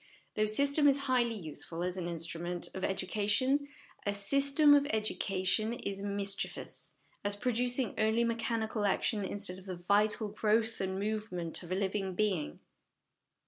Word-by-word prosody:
Though 215 Hz, 0 st, +1 dB
system 280 Hz, +6 st, +4 dB
is 280 Hz, 0 st, +4 dB
highly 250 Hz, -4 st, +1 dB
useful 165 Hz, -2 st, -5 dB
as 180 Hz, 0 st, -2 dB
an 180 Hz, -2 st, -3 dB
instrument 170 Hz, +1 st, -3 dB
of -, -, -22 dB
TO -, -, -5 dB
HOME -, -, 0 dB
EDUCATION 205 Hz, +7 st, +1 dB
education, 285 Hz, 0 st, +1 dB, 0.4 s
a 200 Hz, -, +1 dB
'system 275 Hz, +8 st, +4 dB
of 285 Hz, 0 st, +4 dB
education' 215 Hz, -1 st, 0 dB
is 200 Hz, -5 st, -5 dB
mischievous, 200 Hz, 0 st, -2 dB, 0.3 s
as 205 Hz, 0 st, -1 dB
producing 245 Hz, +2 st, 0 dB
only 220 Hz, +2 st, +3 dB
mechanical 230 Hz, -2 st, -1 dB
action 205 Hz, +1 st, 0 dB
instead 195 Hz, -1 st, -2 dB
of 190 Hz, -, -14 dB
the 185 Hz, -, -4 dB
vital 205 Hz, +4 st, +2 dB
growth 220 Hz, +2 st, +1 dB
and 190 Hz, 0 st, -2 dB
movement 200 Hz, -5 st, -2 dB
of 175 Hz, -1 st, -10 dB
a -, -, +1 dB
living 195 Hz, -1 st, -1 dB
being. 185 Hz, -, -1 dB
210 Hz, 155 wpm, -32 LUFS, 190-230 Hz, 0.4 s, system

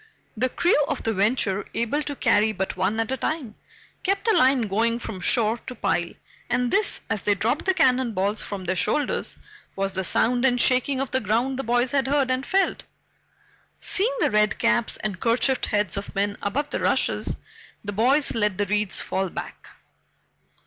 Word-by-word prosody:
The 255 Hz, +3 st, 0 dB
crew 320 Hz, +1 st, +2 dB
of 285 Hz, -, -3 dB
the 225 Hz, -, 0 dB
Venture, 205 Hz, -1 st, +1 dB
able 235 Hz, +6 st, 0 dB
to 290 Hz, -1 st, -5 dB
carry 215 Hz, -3 st, +2 dB
but 190 Hz, -1 st, -3 dB
one 205 Hz, +4 st, 0 dB
at 225 Hz, +2 st, -1 dB
a 265 Hz, -, -1 dB
time, 265 Hz, -4 st, -3 dB, 0.5 s
kept 395 Hz, +3 st, -1 dB
a 445 Hz, -, +4 dB
line 260 Hz, 0 st, +4 dB
going 225 Hz, +3 st, 0 dB
from 220 Hz, -5 st, -7 dB
shore 225 Hz, +4 st, +2 dB
to 255 Hz, -, -5 dB
pile, 190 Hz, -5 st, -1 dB, 0.4 s
and 245 Hz, -1 st, 0 dB
this, 405 Hz, +1 st, +1 dB
as 205 Hz, -, -2 dB
they 205 Hz, -, +2 dB
dropped 225 Hz, +9 st, -1 dB
the 380 Hz, 0 st, +2 dB
cannon 255 Hz, -7 st, +2 dB
balls 205 Hz, +2 st, -1 dB
from 195 Hz, -3 st, -6 dB
their 185 Hz, +2 st, -1 dB
shoulders, 185 Hz, -, -1 dB, 0.4 s
was 195 Hz, 0 st, -2 dB
the 190 Hz, -, -2 dB
sound 245 Hz, +6 st, +1 dB
and 250 Hz, -2 st, +3 dB
shaking 255 Hz, +2 st, +2 dB
of 270 Hz, -, -3 dB
the 260 Hz, -, +1 dB
ground 240 Hz, +5 st, 0 dB
the -, -, -2 dB
boys 245 Hz, +1 st, +1 dB
had 275 Hz, -2 st, +1 dB
heard 275 Hz, -2 st, +1 dB
and 255 Hz, +1 st, -2 dB
felt. 390 Hz, 0 st, +1 dB, 0.9 s
Seeing 455 Hz, +6 st, 0 dB
the -, -, +2 dB
red 210 Hz, 0 st, +2 dB
caps 235 Hz, -1 st, +1 dB
and 200 Hz, -4 st, -3 dB
kerchiefed 245 Hz, +5 st, +1 dB
heads 205 Hz, -3 st, 0 dB
of 200 Hz, -, -6 dB
men 200 Hz, +1 st, 0 dB
above 280 Hz, +9 st, -2 dB
the -, -, -2 dB
rushes, -, -, +1 dB, 0.5 s
the 205 Hz, -, -3 dB
boys 260 Hz, +8 st, +3 dB
let 210 Hz, -4 st, 0 dB
the 205 Hz, -, 0 dB
reeds 210 Hz, 0 st, 0 dB
fall 190 Hz, -1 st, -2 dB
back. -, -, -8 dB
230 Hz, 190 wpm, -24 LUFS, 205-265 Hz, 0.9 s, a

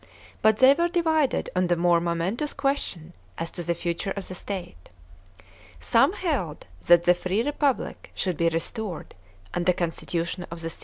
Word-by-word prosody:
But 220 Hz, -1 st, +4 dB
they 260 Hz, +3 st, +7 dB
were 340 Hz, +4 st, +1 dB
divided 320 Hz, -5 st, +1 dB
on 180 Hz, 0 st, +2 dB
the 175 Hz, -, +2 dB
more 170 Hz, 0 st, +3 dB
momentous 175 Hz, -, -1 dB
question 185 Hz, -, -2 dB, 0.2 s
as 165 Hz, -, -4 dB
to -, -, -5 dB
the 170 Hz, 0 st, -1 dB
future 170 Hz, +3 st, -3 dB
of 195 Hz, -, -5 dB
the -, -, -5 dB
state. 180 Hz, -, -7 dB, 0.9 s
Some -, -, +3 dB
held -, -, -2 dB, 0.2 s
that 175 Hz, 0 st, +7 dB
the 175 Hz, -, +6 dB
free 185 Hz, +5 st, -1 dB
Republic 285 Hz, -1 st, -1 dB
should 185 Hz, -3 st, -1 dB
be 170 Hz, +2 st, +2 dB
restored 170 Hz, +3 st, -4 dB, 0.4 s
and 175 Hz, 0 st, -1 dB
the 180 Hz, -, +5 dB
constitution 170 Hz, +1 st, -3 dB
of 170 Hz, 0 st, -7 dB
the 165 Hz, 0 st, -4 dB
Ca? -, -, -9 dB
180 Hz, 170 wpm, -26 LUFS, 170-225 Hz, 0.9 s, they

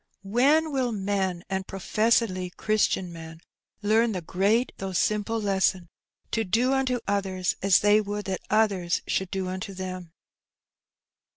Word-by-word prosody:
When 280 Hz, +10 st, +3 dB
will 260 Hz, -3 st, 0 dB
men, 190 Hz, -4 st, -1 dB
and 190 Hz, 0 st, -3 dB
professedly 195 Hz, -1 st, +1 dB
Christian 190 Hz, -2 st, 0 dB
men, 160 Hz, -1 st, -10 dB, 0.4 s
learn 220 Hz, +2 st, +3 dB
the 180 Hz, -, -3 dB
great 205 Hz, +9 st, +1 dB
though 190 Hz, -1 st, -5 dB
simple 210 Hz, +4 st, 0 dB
lesson 190 Hz, -4 st, 0 dB, 0.2 s
— -, -, -47 dB
^to 225 Hz, -, +1 dB
do 250 Hz, +6 st, +2 dB
unto 260 Hz, -3 st, 0 dB
others 190 Hz, -2 st, -1 dB
as 195 Hz, -1 st, +4 dB
they 210 Hz, +1 st, +5 dB
would 205 Hz, 0 st, -4 dB
that 190 Hz, -2 st, -3 dB
others 200 Hz, -5 st, +1 dB
should 190 Hz, -1 st, -1 dB
do 190 Hz, -1 st, -3 dB
unto 190 Hz, +2 st, -5 dB
them? 185 Hz, -2 st, -6 dB
200 Hz, 145 wpm, -26 LUFS, 185-220 Hz, 0.4 s, they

